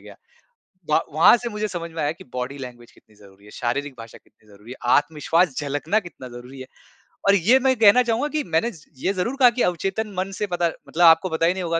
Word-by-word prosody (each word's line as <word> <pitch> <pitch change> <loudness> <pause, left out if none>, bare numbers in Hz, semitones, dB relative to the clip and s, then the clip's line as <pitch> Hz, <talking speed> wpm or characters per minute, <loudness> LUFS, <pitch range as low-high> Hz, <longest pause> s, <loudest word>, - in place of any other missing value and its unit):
गया। - - -14 0.7
व 155 - +4 0.2
वहाँ 165 +9 +6
से 240 0 -5
मुझे 210 0 -3
समझ 170 -3 -6
में 165 - -5
आया 145 +1 0
कि 165 - -15
बॉडी 125 +3 -5
लैंग्वेज 120 -2 -10
कितनी 110 - -25
ज़रूरी 100 -1 -19
है, 105 - -15
शारीरिक 135 +5 -3
भाषा 115 0 -11
कितनी 110 - -31
ज़रूरी 105 +3 -16
है, - - -10 0.2
आत्मविश्वास 155 +1 +1
झलकना 150 +8 -1
कितना 170 -9 -11
ज़रूरी 125 +2 -11
है। 130 - -8 0.6
और 200 - +6
ये 225 +9 +4
मैं 260 0 +2
कहना 225 +4 +6
चाहूँगा 235 +5 -1
कि 305 -1 -2
मैंने 230 +7 -1
ज 160 - -16 0.2
ये 190 - -1
ज़रूर 200 +8 -2
कहा 250 -2 +7
कि 245 - -3
अवचेतन 195 +5 -2
मन 190 +1 -2
से 210 - -1
पता 175 -2 0 0.2
मतलब 175 +2 0
आपको 165 +3 +5
पता 160 +1 0
ही 175 - +3
नहीं 185 - -5
होगा 165 -1 -1
165 Hz, 235 wpm, -22 LUFS, 135-205 Hz, 0.7 s, कहा